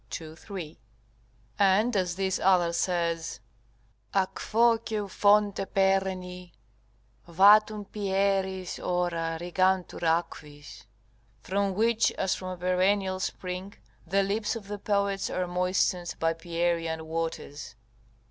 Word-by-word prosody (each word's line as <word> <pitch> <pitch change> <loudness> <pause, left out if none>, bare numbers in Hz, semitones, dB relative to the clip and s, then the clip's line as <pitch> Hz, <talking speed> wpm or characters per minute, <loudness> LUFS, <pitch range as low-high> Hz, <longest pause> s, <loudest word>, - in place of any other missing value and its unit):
2, 160 -1 -7
3.] 170 - -8 0.8
and 205 +4 +3
as 180 -3 0
this 190 0 -1
other 180 -3 +3
says, 170 -2 -1 0.8
"A 195 -1 +4
quo, 230 +4 +2
ceu 215 -3 -4
fonte 205 0 +3
perenni, 190 -2 0 0.8
Vatum 205 +4 +5
Pieriis 195 -2 -1
ora 170 -2 -1
rigantur 185 +1 0
aquis" 160 -3 -3 0.5
["From 195 +3 -1
which, 225 +2 +2
as 190 -1 0
from 185 - -6
a 185 0 -5
perennial 185 +2 +1
spring, 185 +1 -5 0.3
the 195 +3 +2
lips 210 +3 -1
of 215 -3 -8
the 205 0 -5
poets 200 -1 0
are 185 - -1
moistened 180 0 0
by 165 0 +1
Pierian 165 -1 -2
waters." 160 -4 -5
185 Hz, 110 wpm, -28 LUFS, 175-200 Hz, 0.8 s, Vatum